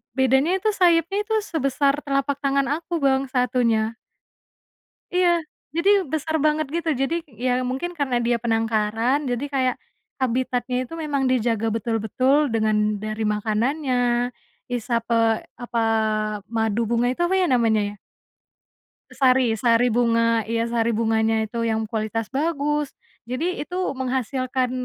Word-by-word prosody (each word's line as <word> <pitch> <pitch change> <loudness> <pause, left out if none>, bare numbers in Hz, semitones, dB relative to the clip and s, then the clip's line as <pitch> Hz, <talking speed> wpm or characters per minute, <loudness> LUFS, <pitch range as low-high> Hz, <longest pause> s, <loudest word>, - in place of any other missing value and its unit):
Bedanya 265 +6 +3
itu 430 +3 +1
sayapnya 365 +1 +2
itu 445 - -3
sebesar 280 -4 0
telapak 275 0 0
tangan 275 -1 +1
aku 340 -1 -4
Bang 270 0 +2
satunya. 240 -4 +1 1.2
Iya 360 -1 +4 0.5
jadi 335 +4 +2 0.2
besar 315 +1 -1
banget 310 0 +2
gitu 335 -1 -1
jadi 270 +5 0 0.3
ya 255 - +2 0.2
mungkin 270 +8 -3
karena 270 -3 0
dia 240 0 +2
penangkaran 225 +2 +1
jadi 245 +3 -2
kayak, 255 -2 +1 0.5
habitatnya 250 0 -1
itu 255 - -11
memang 280 -3 -1
dijaga 225 -3 +1
betul-betul 240 +6 +1
dengan 220 -1 +2 0.3
dari 215 +1 -4
makanannya 220 +7 0 0.8
isap, 235 -1 -1
eee, 225 -1 +2 0.2
apa, 240 -1 -2 0.8
madu 225 0 +1
bunga 235 0 +2
itu 305 - -5
apa 355 +2 +1
ya - - +3
namanya 225 -3 +3
ya? - - -16 1.2
Sari 255 -3 +3
sari 230 +2 +3
bunga 230 -1 +2
iya 230 0 0
sari 235 0 +1
bunganya 220 0 +1
itu 230 +2 -3
yang 220 -1 -1
kualitas 220 0 -2
bagus, 295 0 -1 0.3
jadi 285 +10 -2
itu 355 - -8 0.2
menghasilkan, 255 0 -1
250 Hz, 130 wpm, -23 LUFS, 225-280 Hz, 1.2 s, Iya